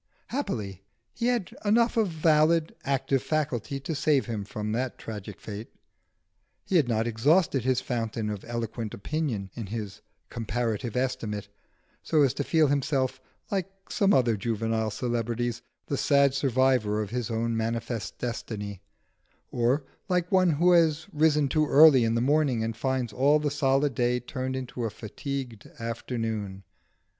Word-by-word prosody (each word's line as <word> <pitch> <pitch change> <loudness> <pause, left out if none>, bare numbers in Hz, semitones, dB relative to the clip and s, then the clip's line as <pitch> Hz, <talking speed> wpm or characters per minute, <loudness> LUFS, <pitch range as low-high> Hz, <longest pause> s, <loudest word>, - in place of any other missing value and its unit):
Happily 110 - -3 0.3
he 235 - -1
had 240 -7 -1
enough 230 +3 +3
of 225 -3 +3
valid, 160 0 +3
active 135 -1 0
faculty 140 -4 -2
to 160 - -3
save 145 -2 +2
him 110 -4 -3
from 105 +1 -4
that 125 +3 -2
tragic 105 -2 -8
fate. 105 +1 -7 1.0
He 190 - +2
had 150 -6 +3
not 110 -1 +1
exhausted 135 +5 +2
his 130 0 +1
fountain 115 -2 -2
of 105 -2 -6
eloquent 115 -2 -4
opinion 110 - -3
in 115 -4 -6
his 105 -2 -6 0.3
'Comparative 115 -1 -2
Estimate,' 110 -6 -2 0.5
so 155 -3 +3
as 135 - +3
to 140 - -2
feel 160 +1 +3
himself, 135 -2 0 0.3
like 195 -2 -1 0.2
some 200 -1 +3
other 125 - +4
juvenile 115 +1 -1
celebrities, 120 +1 -2 0.2
the 140 - -2
sad 140 -1 +4
survivor 130 -5 +2
of 105 - -8
his 125 -2 -2
own 115 0 -1
manifest 115 -1 -3
destiny, 105 -5 -5 0.7
or 125 +5 +1 0.3
like 180 -1 0
one 185 -2 +4
who 170 +3 +3
has 160 -2 +4
risen 150 -1 +3
too 155 +2 +1
early 145 -3 +7
in 115 0 +1
the 115 - +1
morning, 135 -3 +2
and 115 0 -2
finds 125 -1 -1
all 140 +7 +4
the 150 -1 -1
solid 140 0 +2
day 120 +1 +1
turned 130 +1 -4
into 130 -2 -5
a 115 - 0
fatigued 120 +1 -6
afternoon. 115 -4 -4
125 Hz, 150 wpm, -27 LUFS, 115-150 Hz, 1.0 s, early